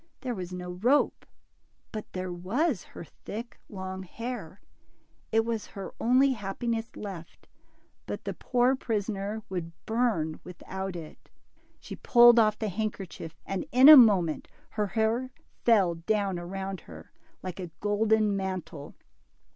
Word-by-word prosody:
There 255 -2 -2
was 185 -4 -6
no 180 0 -5
rope, 240 +11 +1 0.6
but 215 -1 -7
there 185 -1 -4
was 210 - 0
her - - -11
thick, 220 +9 -9
long 190 -1 -6
hair. 205 -2 -7 0.7
It 225 0 +3
was 230 -2 -3
her 195 -1 -8
only 260 +3 +4
happiness 225 +1 -3
left, 185 -5 -9 0.6
but - - -5
the - - -2
poor 250 +1 +2
prisoner 210 -2 -3
would 170 -3 -5
burn 220 -10 0
without 190 +1 -6
it. 160 -3 -10 0.5
She - - -8
pulled 240 -1 +7
off 215 -1 +3
the 215 - -2
handkerchief, 195 -5 -5
and 195 -1 -3
in 255 +3 +7
a 310 - +13
moment 195 - +5 0.2
her 210 -1 -1
hair 225 +5 0 0.4
fell 200 -7 +5
down 190 +2 -1
around 190 +2 -5
her, - - -12 0.3
like 185 0 -6
a 180 -2 -5
golden 210 0 +2
mantle. 180 -6 -5
205 Hz, 135 wpm, -28 LUFS, 185-230 Hz, 0.7 s, a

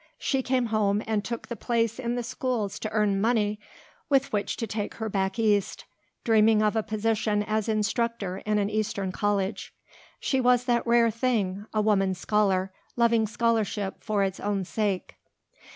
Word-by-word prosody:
She 270 -2 0
came 255 -1 +1
home 210 -1 +2
and 215 -2 -1
took 235 0 -5
the 235 - -5
place 230 +1 -1
in 240 -1 -2
the 245 - -2
schools 240 -4 -2
to 215 - -3
earn 210 -3 +1
money 215 -2 +1 0.5
with 275 -3 +2
which 205 -1 -1
to 230 - -2
take 210 -1 -4
her 220 -1 -4
back 190 -1 -1
East, 210 -3 +1 0.4
dreaming 220 -1 +4
of 210 +1 +1
a 220 - +2
position 215 -1 0
as 215 +1 -1
instructor 215 -2 -1
in 210 +1 -1
an 200 -1 +1
eastern 205 -3 -1
college. 200 0 -2 0.4
She 265 -2 0
was 250 0 +3
that 240 -1 +1
rare 235 -1 +4
thing, 215 -4 -1
a 215 - +1
woman 195 -3 +2
scholar, 195 0 +1 0.2
loving 230 -2 +3
scholarship 215 -3 -1
for 210 -2 +1
its 190 -1 -2
own 200 -2 -1
sake. 200 -2 -2
215 Hz, 170 wpm, -27 LUFS, 205-230 Hz, 0.5 s, dreaming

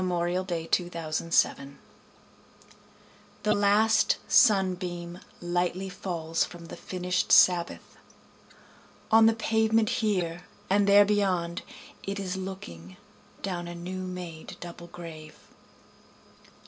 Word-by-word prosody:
Dirge 180 +1 -1
for 165 -2 -2
Two 175 -1 +2
Veterans 165 -1 +1 2.0
The 210 0 +3
last 215 +2 +3
sunbeam 180 -4 +2 0.2
Lightly 175 +2 -1
falls 170 -3 -2
from 170 -1 -9
the - - -7
finishâd 180 -1 -2
Sabbath, 175 -2 +4 1.1
On 225 0 +7
the 225 - +3
pavement 220 -1 +2
here, 180 -5 -1 0.3
and 200 +1 +3
there 205 0 +7
beyond 185 -5 0 0.4
it 200 +1 -4
is 190 -1 -3
looking, 95 - -8 0.5
Down 175 -3 -3
a 175 - -7
new 185 +2 -6
made 180 -3 -7
double 170 0 -9
grave. 165 -3 -10
180 Hz, 105 wpm, -27 LUFS, 170-200 Hz, 2.0 s, On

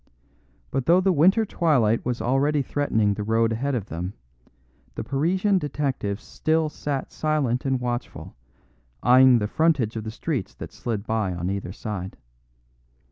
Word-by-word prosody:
But 135 -1 -2
though 175 +2 +6
the 190 +1 +2
winter 190 +8 +4
twilight 130 - +2
was 125 -1 -2
already 140 +3 +2
threatening 110 -7 +1
the 105 - -5
road 115 +1 +2
ahead 130 +5 -1
of 110 -6 -2
them, 90 +1 -5 0.8
the - - -4
Parisian 185 +8 +1
detective 135 - -2
still 160 +4 -1
sat 145 -2 -4
silent 145 -6 0
and 135 -1 +1
watchful, 120 0 -5 0.7
eyeing 130 0 +7
the 105 - 0
frontage 135 -3 +1
of 110 - -4
the 110 - -5
streets 125 - -4
that - - -9
slid 110 -3 -4
by 110 -5 -1
on 90 +2 -2
either 100 -2 -4
side. 95 -2 -6
125 Hz, 150 wpm, -24 LUFS, 110-150 Hz, 0.8 s, eyeing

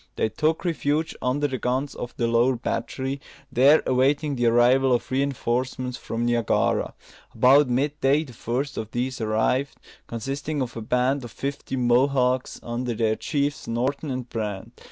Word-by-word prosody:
They 110 - 0
took 155 - 0
refuge 160 -2 0
under 140 +4 +1
the 130 -2 -4
guns 130 +3 -1
of 120 - -7
the 120 - +1
lower 120 +3 +3
battery, 135 +3 -3 0.3
there 135 +5 +5
awaiting 140 +3 +2
the 120 -2 +1
arrival 125 +3 +4
of 120 - -1
reinforcements 130 -1 -1
from 115 -1 -3
Niagara. 120 -2 +1 0.4
About 130 +4 +5
mid 140 +4 0
day 140 +3 +3
the 130 -6 -12
first 130 +6 -3
of 110 - -5
these 125 +2 -3
arrived, 110 +5 0 0.3
consisting 140 +6 -4
of 130 -3 -3
a 115 - -5
band 125 +4 +1
of 120 - -7
fifty 140 +2 -4
Mohawks, 125 +1 +2
under 120 0 -3
their 110 -1 +1
chiefs, 145 +1 -2
Norton 130 +6 -1
and 130 -2 -4
Brant. 110 0 -5
130 Hz, 155 wpm, -24 LUFS, 120-140 Hz, 0.4 s, there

